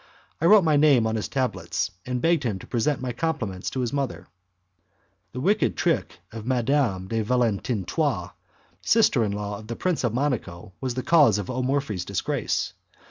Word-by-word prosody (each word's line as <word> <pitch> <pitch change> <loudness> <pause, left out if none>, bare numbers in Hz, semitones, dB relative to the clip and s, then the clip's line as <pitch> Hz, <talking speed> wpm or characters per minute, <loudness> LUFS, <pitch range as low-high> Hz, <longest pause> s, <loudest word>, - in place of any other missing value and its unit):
I - - +1
wrote 210 0 +7
my 155 -3 +3
name 145 -6 +5
on 110 0 0
his 110 - -2
tablets, 100 -9 -2 0.2
and 125 - -2
I - - 0
begged 165 0 +3
him 115 -8 -2
to - - -11
present 130 +4 0
my 125 - -2
compliments 115 - -2
to 130 - -3
his 120 0 -2
mother. 140 -3 -2 1.1
A - - -3
wicked - - +1
trick - - -1
of 110 -1 -7
Madame 120 -5 0
de 115 +2 -1
Valentinois, 115 -3 0 0.5
sister 215 - +3
in 105 - -1
law 100 0 -4
of 110 - -12
the 115 - -4
Prince 180 0 -1
of 120 - +1
Monaco, 110 -9 -2
was 130 -2 -2
the 130 - -3
cause 145 - +5
of 105 +3 -4
O 130 +1 -2
Morphi's 130 -8 -1
disgrace. 100 0 -2
120 Hz, 185 wpm, -25 LUFS, 105-140 Hz, 1.1 s, wrote